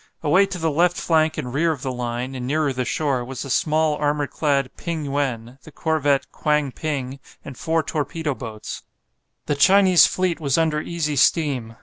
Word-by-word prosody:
Away 185 Hz, +6 st, +4 dB
to 195 Hz, -2 st, -5 dB
the 165 Hz, -2 st, 0 dB
left 175 Hz, +4 st, +2 dB
flank 160 Hz, -1 st, +1 dB
and 125 Hz, -1 st, -4 dB
rear 165 Hz, +4 st, +2 dB
of 140 Hz, -5 st, -5 dB
the 130 Hz, -, -2 dB
line, 125 Hz, +1 st, -4 dB
and 125 Hz, -1 st, -5 dB
nearer 150 Hz, 0 st, 0 dB
the 125 Hz, 0 st, -2 dB
shore, 135 Hz, -1 st, -1 dB
was 130 Hz, +1 st, -6 dB
the 135 Hz, -, -6 dB
small, 155 Hz, +1 st, +2 dB
armour 145 Hz, 0 st, 0 dB
clad 140 Hz, -3 st, -1 dB
"Ping 165 Hz, -3 st, -4 dB
yuen," 135 Hz, -3 st, -3 dB
the 155 Hz, -, -14 dB
corvette 145 Hz, -3 st, 0 dB
"Kwang 150 Hz, -2 st, 0 dB
ping," 135 Hz, -3 st, -4 dB, 0.3 s
and 140 Hz, -, -8 dB
four 160 Hz, +4 st, 0 dB
torpedo 150 Hz, +1 st, -2 dB
boats. 110 Hz, -4 st, -7 dB, 0.6 s
The -, -, 0 dB
Chinese 185 Hz, +5 st, +6 dB
fleet 185 Hz, -2 st, -1 dB
was 140 Hz, -3 st, 0 dB
under 160 Hz, -2 st, +1 dB
easy 155 Hz, -3 st, -2 dB
steam. 130 Hz, -6 st, +1 dB
145 Hz, 185 wpm, -22 LUFS, 130-160 Hz, 0.6 s, Chinese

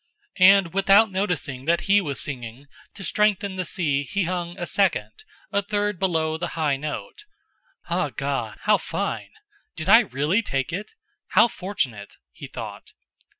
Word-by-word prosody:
And 185 Hz, -2 st, +6 dB
without 195 Hz, +2 st, +5 dB
noticing 175 Hz, -9 st, -2 dB
that 170 Hz, +2 st, +2 dB
he 200 Hz, +1 st, +4 dB
was 145 Hz, -7 st, -4 dB
singing, 125 Hz, -1 st, -6 dB, 0.3 s
to 195 Hz, -, -9 dB
strengthen 200 Hz, 0 st, +1 dB
the 185 Hz, -1 st, -2 dB
si 150 Hz, -6 st, 0 dB
he 190 Hz, +6 st, -2 dB
sung 175 Hz, 0 st, -3 dB
a 175 Hz, -, -3 dB
second, 195 Hz, +2 st, +1 dB, 0.4 s
a 200 Hz, -1 st, +2 dB
third 205 Hz, -1 st, -1 dB
below 160 Hz, -4 st, 0 dB
the 175 Hz, -, -3 dB
high 150 Hz, -3 st, +1 dB
note. 150 Hz, -, -6 dB, 0.6 s
"Ah, -, -, 0 dB
God! -, -, -3 dB
How -, -, +4 dB
fine! -, -, -3 dB, 0.5 s
Did 160 Hz, +2 st, -4 dB
I 225 Hz, +3 st, +9 dB
really 155 Hz, -, 0 dB
take 135 Hz, -, -2 dB
it? 205 Hz, -, -5 dB, 0.3 s
How -, -, +5 dB
fortunate!" 130 Hz, -, -4 dB, 0.2 s
he -, -, -10 dB
thought. -, -, -9 dB
180 Hz, 150 wpm, -24 LUFS, 150-200 Hz, 0.6 s, I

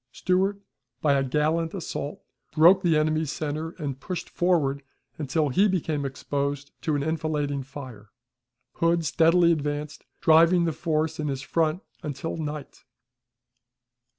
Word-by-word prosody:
Stewart, 190 Hz, +6 st, 0 dB, 0.4 s
by 145 Hz, +1 st, +3 dB
a 140 Hz, -, +2 dB
gallant 155 Hz, +5 st, 0 dB
assault, 150 Hz, -5 st, -5 dB, 0.3 s
broke 175 Hz, +4 st, +7 dB
the 170 Hz, -4 st, +3 dB
enemy's 155 Hz, -1 st, +1 dB
center, 155 Hz, +1 st, -3 dB
and 140 Hz, -5 st, -4 dB
pushed 180 Hz, +4 st, -5 dB
forward 155 Hz, -6 st, +1 dB, 0.4 s
until 150 Hz, +1 st, 0 dB
he 195 Hz, +11 st, +4 dB
became 160 Hz, -6 st, -1 dB
exposed 140 Hz, +1 st, -3 dB
to 155 Hz, -, 0 dB
an 140 Hz, -, 0 dB
enfilading 150 Hz, -3 st, -1 dB
fire. 130 Hz, -6 st, -10 dB, 0.7 s
Hood 165 Hz, 0 st, +2 dB
steadily 170 Hz, +2 st, +4 dB
advanced, 150 Hz, -1 st, -3 dB, 0.2 s
driving 165 Hz, +2 st, +5 dB
the 165 Hz, -, 0 dB
force 160 Hz, 0 st, -1 dB
in 150 Hz, -, -1 dB
his 135 Hz, -1 st, -3 dB
front 160 Hz, +4 st, 0 dB, 0.2 s
until 150 Hz, -1 st, -4 dB
night. 150 Hz, -3 st, -6 dB
155 Hz, 130 wpm, -26 LUFS, 145-165 Hz, 0.7 s, broke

